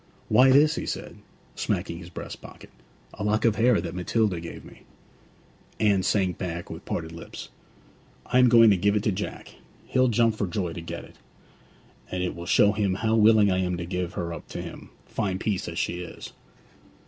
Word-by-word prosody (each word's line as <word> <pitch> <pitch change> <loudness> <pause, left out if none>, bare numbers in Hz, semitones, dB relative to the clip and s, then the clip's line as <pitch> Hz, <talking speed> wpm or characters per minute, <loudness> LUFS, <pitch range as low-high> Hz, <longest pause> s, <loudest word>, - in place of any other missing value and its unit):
'Why, 130 +1 +6
this,' 150 +4 +5
he - - -4
said, - - -5 0.4
smacking 85 - -2
his 85 -1 -10
breast 90 - -8
pocket. - - -13 0.4
'A 105 - -6
lock 105 +2 +1
of 110 -2 +3
hair 115 -1 +4
that 85 -3 -5
Matilda 90 +1 0
gave 85 0 -9
me.' - - -15 1.0
Anne 100 -3 +3
sank 95 -2 0
back 85 -2 -5
with - - -9
parted 80 -1 -4
lips. 85 0 -9 0.8
'I 125 - +2
am 125 -1 +6
going 115 -2 +7
to 100 - +3
give 100 +3 +2
it 105 - 0
to 110 - +2
Jack 100 +2 -6 0.3
he'll 130 0 +2
jump 115 -1 +3
for 105 -2 -2
joy 90 -1 -3
to 85 - -6
get 85 0 -6
it! - - -18 0.9
And 90 0 -2
it 90 - -2
will 85 +1 -8
show 105 +3 +5
him 100 -3 0
how 110 +3 0
willing 110 -2 +5
I 95 - +1
am 90 -1 -1
to 85 - -4
give 90 -1 -3
her 85 -1 -3
up 85 - -9
to - - -6
him, - - -10 0.2
fine 95 -4 -2
piece 100 -1 -2
as - - -6
she 90 - -1
is.' 90 -2 -9
100 Hz, 200 wpm, -26 LUFS, 90-110 Hz, 1.0 s, going